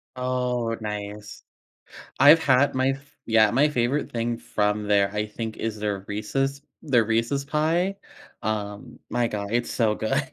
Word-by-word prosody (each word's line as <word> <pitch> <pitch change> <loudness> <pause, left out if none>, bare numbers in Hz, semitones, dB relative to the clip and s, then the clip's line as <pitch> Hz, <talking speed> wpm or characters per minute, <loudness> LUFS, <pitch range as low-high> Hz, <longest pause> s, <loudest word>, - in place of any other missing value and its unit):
Oh, 125 -2 -1
nice. 105 -1 -6 0.8
I've 145 +4 +8
had 140 +1 +3
my 130 +1 +2
f 135 +1 -8
yeah, 110 -2 +5
my 135 +6 +3
favorite 135 +1 0
thing 115 0 -2
from 105 -1 -1
there, 100 -1 +3
I 105 0 -1
think, 110 +1 -6
is 110 -1 -3
their 105 -2 -3
Reese's 135 +7 -2 0.2
their 125 -7 +3
Reese's 115 +5 0
Pie. 165 +6 0 0.5
Um. 110 +3 -4
My 120 -1 +1
god. 100 -2 -4
It's 120 0 0
so 110 -3 +1
good. 110 0 0
115 Hz, 150 wpm, -25 LUFS, 105-135 Hz, 0.8 s, I've